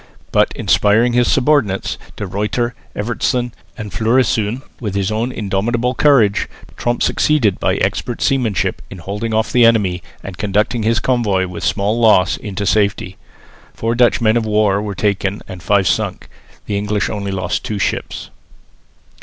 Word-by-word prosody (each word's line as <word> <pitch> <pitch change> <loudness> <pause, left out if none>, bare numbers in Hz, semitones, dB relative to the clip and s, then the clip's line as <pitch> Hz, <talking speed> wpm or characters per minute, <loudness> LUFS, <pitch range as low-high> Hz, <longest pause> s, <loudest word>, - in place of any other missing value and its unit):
But, - - +3
inspiring 115 +4 +3
his 120 0 +3
subordinates 130 -8 +1 0.2
De 105 - -5
Ruyter, 105 +5 -2 0.2
Evertsen 120 +3 -1 0.3
and 105 -3 -6
Floriszoon 115 +3 +1 0.2
with 105 -5 -4
his 100 0 0
own 115 +4 -1
indomitable 115 +4 -1
courage, 125 -9 +3 0.3
Tromp 120 0 -1
succeeded 125 -11 +2
by - - +1
expert - - -2
seamanship 125 -8 0
in 95 - -9
holding 105 +6 -4
off 110 +1 0
the 125 - +4
enemy 100 -6 +3 0.2
and 95 -2 -8
conducting 105 +3 0
his 110 0 +1
convoy 105 -5 +1
with 90 -1 -7
small 105 +3 0
loss 105 -6 +4
into 100 -1 -5
safety. 100 -3 0 0.6
Four 115 +1 -1
Dutch 120 0 +3
men 110 -1 +3
of 115 - -1
war 105 -2 +2
were 105 -1 -4
taken 100 0 -1
and 95 -3 -9
five 100 0 +2
sunk; - - -1 0.4
the 100 -1 -2
English 105 0 -1
only 100 -1 -4
lost 95 -2 -2
two 105 - -3
ships. 100 - -3
105 Hz, 155 wpm, -17 LUFS, 100-120 Hz, 0.6 s, the